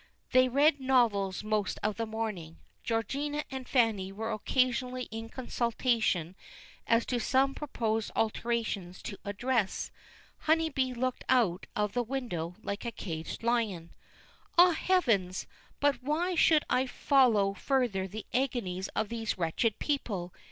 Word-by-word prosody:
They 255 Hz, 0 st, +5 dB
read 285 Hz, +3 st, +4 dB
novels 230 Hz, -8 st, +2 dB
most 215 Hz, -1 st, 0 dB
of 210 Hz, 0 st, 0 dB
the 230 Hz, -1 st, -2 dB
morning. 210 Hz, -7 st, -4 dB, 0.3 s
Georgina 280 Hz, +7 st, -1 dB
and 260 Hz, -1 st, -5 dB
Fanny 220 Hz, -7 st, +2 dB
were 220 Hz, +3 st, -4 dB
occasionally 255 Hz, +2 st, 0 dB
in 225 Hz, +1 st, -6 dB
consultation 230 Hz, -8 st, 0 dB, 0.5 s
as 230 Hz, 0 st, +3 dB
to 245 Hz, -, -1 dB
some 265 Hz, +3 st, +2 dB
proposed 225 Hz, -7 st, -2 dB
alterations 220 Hz, -5 st, -1 dB
to 200 Hz, -, -6 dB
a 200 Hz, -, -3 dB
dress. 235 Hz, -1 st, -1 dB, 0.5 s
Honeybee 310 Hz, -5 st, +1 dB
looked 255 Hz, +1 st, -2 dB
out 215 Hz, -8 st, +2 dB
of 210 Hz, -1 st, 0 dB
the 245 Hz, -, +1 dB
window 225 Hz, -10 st, -3 dB
like 200 Hz, +1 st, -4 dB
a 235 Hz, -, -3 dB
caged 165 Hz, -3 st, -6 dB
lion. 220 Hz, -8 st, 0 dB, 0.7 s
Ah, 355 Hz, +1 st, +8 dB
Heavens! 235 Hz, -, +1 dB, 0.3 s
but 280 Hz, -3 st, +2 dB
why 315 Hz, +7 st, 0 dB
should 315 Hz, -2 st, +4 dB
I 255 Hz, +1 st, +2 dB
follow 240 Hz, -8 st, +3 dB
further 220 Hz, -4 st, 0 dB
the 210 Hz, +3 st, -7 dB
agonies 215 Hz, -8 st, -1 dB
of 215 Hz, -, 0 dB
these 225 Hz, -2 st, -2 dB
wretched 185 Hz, +6 st, 0 dB
people. 200 Hz, -12 st, -2 dB
230 Hz, 135 wpm, -30 LUFS, 200-260 Hz, 0.7 s, Ah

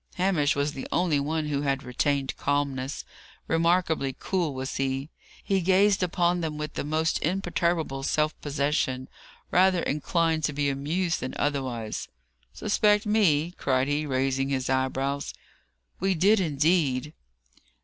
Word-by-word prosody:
Hamish 180 Hz, -6 st, +2 dB
was 145 Hz, +1 st, 0 dB
the 135 Hz, -, -6 dB
only 170 Hz, -5 st, +2 dB
one 155 Hz, +2 st, -1 dB
who 145 Hz, -2 st, -1 dB
had 135 Hz, -1 st, -1 dB
retained 135 Hz, +2 st, -1 dB
calmness. 140 Hz, -1 st, -2 dB, 0.4 s
Remarkably 165 Hz, -5 st, +1 dB
cool 180 Hz, -5 st, -1 dB
was 130 Hz, 0 st, -4 dB
he. 135 Hz, +2 st, -2 dB, 0.3 s
He 195 Hz, -1 st, +1 dB
gazed 195 Hz, +2 st, +3 dB
upon 175 Hz, 0 st, +1 dB
them 155 Hz, -2 st, -3 dB
with 150 Hz, 0 st, -5 dB
the -, -, -3 dB
most 155 Hz, +2 st, 0 dB
imperturbable 170 Hz, -5 st, -1 dB
self 150 Hz, +3 st, +1 dB
possession 140 Hz, -3 st, -1 dB, 0.4 s
rather 185 Hz, -1 st, +4 dB
inclined 160 Hz, +2 st, 0 dB
to 150 Hz, -, -1 dB
be 145 Hz, 0 st, 0 dB
amused 160 Hz, +6 st, -1 dB
than 130 Hz, -, -5 dB
otherwise. 130 Hz, -6 st, -2 dB, 0.4 s
"Suspect 210 Hz, -, +2 dB
me!" 175 Hz, -7 st, +2 dB
cried 130 Hz, -1 st, +1 dB
he, 150 Hz, +1 st, -1 dB
raising 135 Hz, 0 st, 0 dB
his 135 Hz, -1 st, -1 dB
eyebrows. 135 Hz, +2 st, -1 dB, 0.6 s
"We 190 Hz, +1 st, +1 dB
did, 200 Hz, +6 st, +4 dB
indeed!" 150 Hz, -3 st, +1 dB
150 Hz, 135 wpm, -27 LUFS, 135-175 Hz, 0.6 s, rather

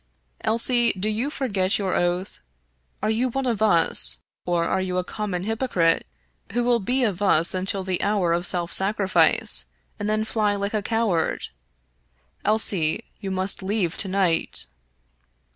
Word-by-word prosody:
" -, -, -31 dB
Elsie, 235 Hz, +1 st, +4 dB
do 195 Hz, +2 st, -3 dB
you 220 Hz, +6 st, -1 dB
forget 200 Hz, -10 st, 0 dB
your 195 Hz, -3 st, -2 dB
oath? 175 Hz, +2 st, -1 dB, 0.6 s
Are -, -, +1 dB
you 240 Hz, +4 st, 0 dB
one 270 Hz, +2 st, -3 dB
of 230 Hz, -4 st, -1 dB
us, 165 Hz, -, +4 dB, 0.3 s
or 170 Hz, -1 st, +1 dB
are 190 Hz, -, 0 dB
you 185 Hz, -1 st, -2 dB
a 180 Hz, -, 0 dB
common 190 Hz, -2 st, -4 dB
hypocrite, 210 Hz, -7 st, +1 dB, 0.5 s
who 240 Hz, +1 st, 0 dB
will 240 Hz, -1 st, +2 dB
be 250 Hz, +6 st, 0 dB
of 205 Hz, -5 st, -1 dB
us 170 Hz, -4 st, +2 dB
until 190 Hz, +1 st, -2 dB
the 185 Hz, -1 st, -2 dB
hour 195 Hz, -5 st, +1 dB
of 175 Hz, +1 st, -1 dB
self 175 Hz, -1 st, -3 dB
sacrifice, 190 Hz, -, +2 dB, 0.3 s
and 205 Hz, -, -2 dB
then 215 Hz, 0 st, 0 dB
fly 210 Hz, -2 st, 0 dB
like 200 Hz, +1 st, -3 dB
a 215 Hz, -, 0 dB
coward? 210 Hz, -6 st, -1 dB, 0.9 s
Elsie, 205 Hz, -3 st, +1 dB, 0.2 s
you 195 Hz, -, -5 dB
must 190 Hz, +1 st, -1 dB
leave 190 Hz, -3 st, -1 dB
to 200 Hz, -, +2 dB
night." 185 Hz, -, +1 dB
195 Hz, 160 wpm, -23 LUFS, 180-220 Hz, 0.9 s, Elsie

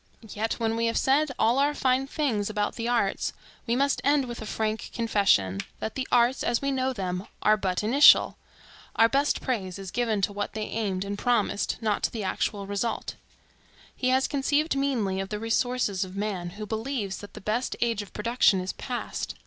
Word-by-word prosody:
Yet 220 Hz, +2 st, -1 dB
when 225 Hz, -1 st, -1 dB
we 230 Hz, 0 st, +1 dB
have 230 Hz, -, 0 dB
said 285 Hz, +3 st, +3 dB
all 235 Hz, +4 st, +3 dB
our 290 Hz, +1 st, +2 dB
fine 260 Hz, 0 st, +1 dB
things 245 Hz, -10 st, -1 dB
about 210 Hz, -1 st, -1 dB
the 230 Hz, 0 st, -4 dB
arts, 235 Hz, -5 st, 0 dB, 0.3 s
we 235 Hz, -, +1 dB
must 280 Hz, +2 st, +1 dB
end 285 Hz, -1 st, +3 dB
with 240 Hz, -2 st, -7 dB
a 220 Hz, -, -6 dB
frank 220 Hz, 0 st, -2 dB
confession, 200 Hz, -, +2 dB, 0.2 s
that 220 Hz, -, -4 dB
the 265 Hz, -1 st, -3 dB
arts, 245 Hz, +1 st, +3 dB
as 235 Hz, -, +1 dB
we 275 Hz, 0 st, -1 dB
know 260 Hz, 0 st, 0 dB
them, 185 Hz, -4 st, -4 dB, 0.2 s
are 215 Hz, -, +5 dB
but 190 Hz, -2 st, -1 dB
initial. 260 Hz, +7 st, +6 dB, 0.6 s
Our 225 Hz, -, +6 dB
best 280 Hz, +4 st, +1 dB
praise 200 Hz, -8 st, -2 dB
is 195 Hz, -2 st, -7 dB
given 230 Hz, -4 st, 0 dB
to 205 Hz, -, +1 dB
what 205 Hz, 0 st, -3 dB
they 215 Hz, 0 st, -3 dB
aimed 200 Hz, -4 st, -2 dB
and 200 Hz, +1 st, -4 dB
promised, 230 Hz, -4 st, 0 dB
not 215 Hz, -2 st, 0 dB
to -, -, 0 dB
the 220 Hz, -3 st, -4 dB
actual 200 Hz, +1 st, -2 dB
result. 205 Hz, +3 st, -2 dB, 0.8 s
He 255 Hz, -, 0 dB
has 260 Hz, +1 st, +3 dB
conceived 290 Hz, +2 st, +1 dB
meanly 240 Hz, -9 st, 0 dB
of 195 Hz, 0 st, -4 dB
the 210 Hz, -, -3 dB
resources 225 Hz, -3 st, 0 dB
of 185 Hz, 0 st, -8 dB
man, 200 Hz, -4 st, -3 dB
who 215 Hz, -, -5 dB
believes 220 Hz, -2 st, -3 dB
that 205 Hz, -, -11 dB
the -, -, -7 dB
best 220 Hz, +6 st, -2 dB
age 230 Hz, -3 st, 0 dB
of 205 Hz, -, -11 dB
production 215 Hz, -3 st, +2 dB
is 185 Hz, +1 st, -3 dB
past. 245 Hz, -1 st, -5 dB
225 Hz, 195 wpm, -27 LUFS, 205-255 Hz, 0.8 s, initial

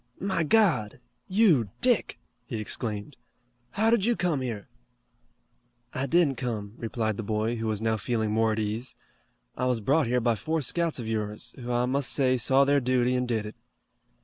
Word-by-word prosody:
"My 190 Hz, -2 st, -1 dB
God! 160 Hz, -, +2 dB, 0.3 s
You, 185 Hz, -, +3 dB
Dick!" 245 Hz, -6 st, +1 dB, 0.3 s
he 115 Hz, -, -4 dB
exclaimed. 110 Hz, +3 st, -4 dB, 0.5 s
"How 220 Hz, +2 st, +1 dB
did 230 Hz, -4 st, +3 dB
you 240 Hz, +2 st, +2 dB
come 170 Hz, -9 st, 0 dB
here?" 115 Hz, -4 st, -5 dB, 1.3 s
"I 135 Hz, +2 st, -2 dB
didn't 155 Hz, -3 st, +2 dB
come," 110 Hz, -5 st, -4 dB
replied 110 Hz, -2 st, -2 dB
the -, -, -3 dB
boy, 110 Hz, +2 st, -1 dB
who 115 Hz, 0 st, -3 dB
was 110 Hz, 0 st, -1 dB
now 110 Hz, 0 st, +1 dB
feeling 110 Hz, 0 st, -1 dB
more 110 Hz, +1 st, +2 dB
at -, -, -4 dB
ease. 110 Hz, +4 st, -3 dB, 0.6 s
"I 125 Hz, -, -1 dB
was 125 Hz, -2 st, +1 dB
brought 140 Hz, +7 st, +2 dB
here 125 Hz, +1 st, +2 dB
by 120 Hz, 0 st, +2 dB
four 155 Hz, +7 st, -2 dB
scouts 170 Hz, +4 st, +1 dB
of 120 Hz, -4 st, -5 dB
yours, 105 Hz, -1 st, -3 dB
who 125 Hz, 0 st, -5 dB
I 120 Hz, 0 st, +1 dB
must 130 Hz, -1 st, 0 dB
say 130 Hz, 0 st, +2 dB
saw 135 Hz, +4 st, +4 dB
their 140 Hz, +1 st, +3 dB
duty 125 Hz, 0 st, +1 dB
and 125 Hz, 0 st, 0 dB
did 110 Hz, -3 st, -1 dB
it." 105 Hz, -, -8 dB
125 Hz, 180 wpm, -27 LUFS, 110-145 Hz, 1.3 s, saw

